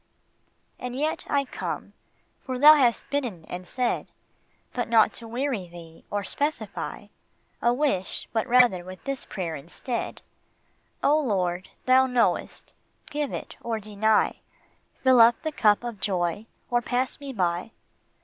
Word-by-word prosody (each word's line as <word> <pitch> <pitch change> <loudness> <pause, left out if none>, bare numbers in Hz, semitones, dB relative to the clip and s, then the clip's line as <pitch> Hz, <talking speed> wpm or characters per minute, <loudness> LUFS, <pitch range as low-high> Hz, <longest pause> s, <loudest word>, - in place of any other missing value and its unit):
And 250 0 -5
yet 305 +4 -1
I 280 -1 +1
come, - - -5 0.5
for 255 -1 -4
thou 295 +4 +10
hast 255 -6 +2
bidden 240 - -2
and 180 0 -7
said, 250 +3 -1 0.7
But 245 - -2
not 225 -2 +5
to 230 - -9
weary 240 -5 -2
thee, 170 -1 -13
or 205 0 -2
specify 270 -2 -3 0.5
A 235 - +4
wish, 245 -8 -1
but 225 +1 0
rather 245 -7 +5
with 185 +1 -10
this 275 -1 -4
prayer 170 -5 -4
instead: 175 - -5 0.4
" - - -41
O 300 +2 +5
Lord, 185 -9 -1 0.2
thou 260 +1 +5
knowest: 250 -2 0 0.4
give 295 -1 -2
it - - -6
or 230 -1 -2
deny, 215 +1 +1 0.6
Fill 260 -2 +7
up 235 +1 +6
the 315 - -1
cup 215 -6 +3
of 235 -4 -5
joy, 185 +2 -1 0.2
or 240 0 +3
pass 250 +2 -1
me 280 -1 -6
by." 180 -3 -1
235 Hz, 145 wpm, -26 LUFS, 190-260 Hz, 0.7 s, thou